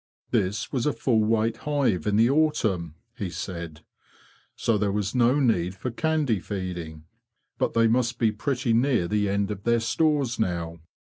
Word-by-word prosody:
'' -, -, -
This 105 Hz, +5 st, 0 dB
was 130 Hz, 0 st, -1 dB
a 150 Hz, -, +1 dB
full 115 Hz, -4 st, +1 dB
weight 110 Hz, +1 st, +1 dB
hive 140 Hz, -, 0 dB
in 105 Hz, -, +2 dB
the 115 Hz, +2 st, +5 dB
autumn,'' 110 Hz, -, +1 dB, 0.2 s
he 100 Hz, -7 st, -4 dB
said, 85 Hz, -3 st, -6 dB, 0.8 s
''so 115 Hz, -, +1 dB
there 105 Hz, -1 st, +1 dB
was 100 Hz, -1 st, -2 dB
no 125 Hz, +3 st, +3 dB
need 95 Hz, -9 st, +1 dB
for 120 Hz, +6 st, -4 dB
candy 150 Hz, -5 st, 0 dB
feeding. 90 Hz, -5 st, -6 dB, 0.5 s
But -, -, 0 dB
they 115 Hz, 0 st, +4 dB
must 120 Hz, +1 st, +1 dB
be 115 Hz, -2 st, +2 dB
pretty 125 Hz, +1 st, -1 dB
near 120 Hz, -6 st, +2 dB
the 105 Hz, +1 st, 0 dB
end 100 Hz, +1 st, 0 dB
of 100 Hz, -2 st, -5 dB
their 120 Hz, 0 st, +2 dB
stores 130 Hz, +2 st, +1 dB
now. 85 Hz, -5 st, -2 dB
110 Hz, 170 wpm, -25 LUFS, 95-125 Hz, 0.8 s, the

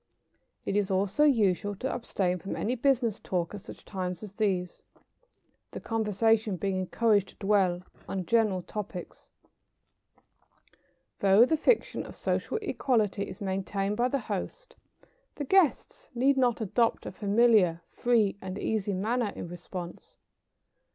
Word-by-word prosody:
It -, -, -1 dB
is 205 Hz, -1 st, +1 dB
also 200 Hz, +8 st, +2 dB
usual 205 Hz, -7 st, +2 dB
to 260 Hz, +7 st, -3 dB
abstain 185 Hz, -6 st, -1 dB
from 195 Hz, -, -5 dB
any 235 Hz, -, -1 dB
business 245 Hz, -4 st, +1 dB
talk 175 Hz, -1 st, -2 dB
at 205 Hz, -, -7 dB
such -, -, -12 dB
times 185 Hz, -1 st, -4 dB
as 210 Hz, -, -7 dB
these, 190 Hz, -4 st, -1 dB, 0.9 s
the -, -, -7 dB
conversation 220 Hz, -2 st, +1 dB
being 195 Hz, +1 st, -1 dB
encouraged 205 Hz, +1 st, +2 dB
to -, -, -17 dB
dwell 195 Hz, -3 st, +1 dB, 0.3 s
on 190 Hz, -2 st, -3 dB
general 210 Hz, -4 st, +2 dB
topics. 200 Hz, -3 st, -7 dB, 1.9 s
Though 200 Hz, +4 st, +6 dB
the 320 Hz, -, +2 dB
fiction 430 Hz, +9 st, +1 dB
of -, -, -10 dB
social -, -, -1 dB
equality 220 Hz, -, 0 dB
is 185 Hz, -, -10 dB
maintained 195 Hz, +1 st, -2 dB
by 240 Hz, +3 st, +2 dB
the 275 Hz, -, 0 dB
host, -, -, -5 dB, 0.6 s
the 290 Hz, -, -4 dB
guests 385 Hz, -, +2 dB
need 270 Hz, +3 st, +3 dB
not 250 Hz, -3 st, +2 dB
adopt 225 Hz, +3 st, +1 dB
a -, -, -5 dB
familiar, 205 Hz, -5 st, +3 dB
free 220 Hz, -5 st, +1 dB
and 190 Hz, 0 st, -5 dB
easy 205 Hz, -2 st, -1 dB
manner 220 Hz, +3 st, 0 dB
in -, -, -6 dB
response. 175 Hz, 0 st, -8 dB
205 Hz, 140 wpm, -29 LUFS, 190-235 Hz, 1.9 s, Though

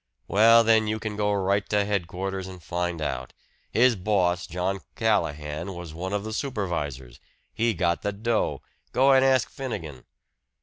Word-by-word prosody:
"Well, 115 Hz, +3 st, +6 dB
then, 110 Hz, -1 st, +4 dB
you 110 Hz, +1 st, 0 dB
can 110 Hz, -1 st, -5 dB
go 105 Hz, 0 st, +1 dB
right 100 Hz, 0 st, +1 dB
to 105 Hz, -1 st, +2 dB
headquarters 95 Hz, -1 st, -3 dB
and 90 Hz, -3 st, -10 dB
find 85 Hz, -1 st, -2 dB
out. 65 Hz, -4 st, -4 dB, 0.4 s
His 120 Hz, +1 st, +4 dB
boss, 90 Hz, -3 st, +1 dB
John 90 Hz, +2 st, -2 dB, 0.2 s
Callahan, 80 Hz, -5 st, -1 dB
was 85 Hz, -3 st, -8 dB
one 90 Hz, +4 st, -5 dB
of 100 Hz, 0 st, -1 dB
the 110 Hz, 0 st, -5 dB
supervisors 85 Hz, -, -3 dB, 0.3 s
he 115 Hz, -1 st, +1 dB
got 85 Hz, -2 st, 0 dB
the 105 Hz, -, -1 dB
dough. 110 Hz, +3 st, -1 dB, 0.3 s
Go 135 Hz, +2 st, +5 dB
and 135 Hz, -1 st, +6 dB
ask 130 Hz, -2 st, +3 dB
Finnegan." 80 Hz, -, -6 dB
100 Hz, 160 wpm, -26 LUFS, 85-110 Hz, 0.4 s, Well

